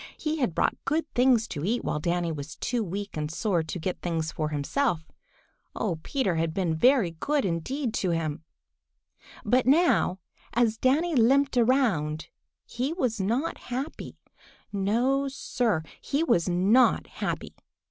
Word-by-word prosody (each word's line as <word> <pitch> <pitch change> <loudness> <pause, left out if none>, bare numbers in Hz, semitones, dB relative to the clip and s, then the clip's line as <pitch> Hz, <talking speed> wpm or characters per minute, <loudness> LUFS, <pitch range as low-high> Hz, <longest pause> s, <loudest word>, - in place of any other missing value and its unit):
He 310 0 -2
had 245 - -1
brought - - 0
good 310 +3 0
things 245 -3 +4
to 145 - -5
eat 230 +7 0
while 150 - -1
Danny 170 +1 0
was 150 0 -6
too 240 -2 -1
weak 200 +2 -5
and 150 -1 -2
sore 175 +1 0
to 160 +3 -5
get 180 +3 -3
things 165 -2 -2
for 155 -1 -2
himself. 160 - -1 0.6
Oh, 175 -7 -2
Peter 195 - -1
had 160 0 -1
been 180 -4 0
very 240 - +4
good 280 - -1
indeed 220 - -2
to 185 - 0
him! 160 -2 -2 1.0
But 245 +3 +2
now, 295 - +4 0.4
as 230 -1 +2
Danny 310 +7 +2
limped 270 +2 +3
around, 225 - +1 0.4
he 255 +6 -2
was 245 - -1
not 235 +11 -1
happy. 265 +6 -6 0.6
No, 240 +8 +1
Sir, 240 -9 -1 0.2
he 285 +4 0
was 175 - +2
not 195 +9 +4
happy. - - -4
220 Hz, 145 wpm, -27 LUFS, 165-260 Hz, 1.0 s, things